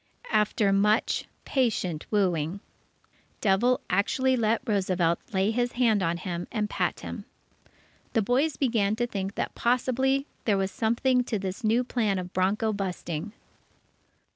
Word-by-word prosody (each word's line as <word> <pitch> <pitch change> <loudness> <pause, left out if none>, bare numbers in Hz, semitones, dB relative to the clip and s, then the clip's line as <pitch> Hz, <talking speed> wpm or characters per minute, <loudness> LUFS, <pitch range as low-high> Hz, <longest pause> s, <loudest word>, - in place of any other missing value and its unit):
After 210 -1 +2
much 210 +2 +2 0.2
patient 205 - 0
wooing, 180 -4 0 0.8
Devil 240 +6 +2
actually 260 +7 +2
let 230 0 +1
Roosevelt 185 -5 +1
lay 195 +1 +2
his 240 +1 0
hand 230 -5 +3
on 170 -2 0
him 175 -1 -4
and 210 -2 -1
pat - - -2
him. - - -7 0.9
The 225 - +2
boys 265 +7 +1
began 225 -6 +1
to 240 +2 0
think 200 -3 -4
that - - -2
possibly 260 +3 +1 0.2
there 205 -3 +3
was 190 0 -1
something 250 +3 +1
in 215 -4 0
this 190 +5 -5
new 225 +3 +3
plan 220 -5 0
of 180 0 -5
bronco 205 +4 +1
busting. 190 -1 -4
210 Hz, 140 wpm, -27 LUFS, 190-240 Hz, 0.9 s, hand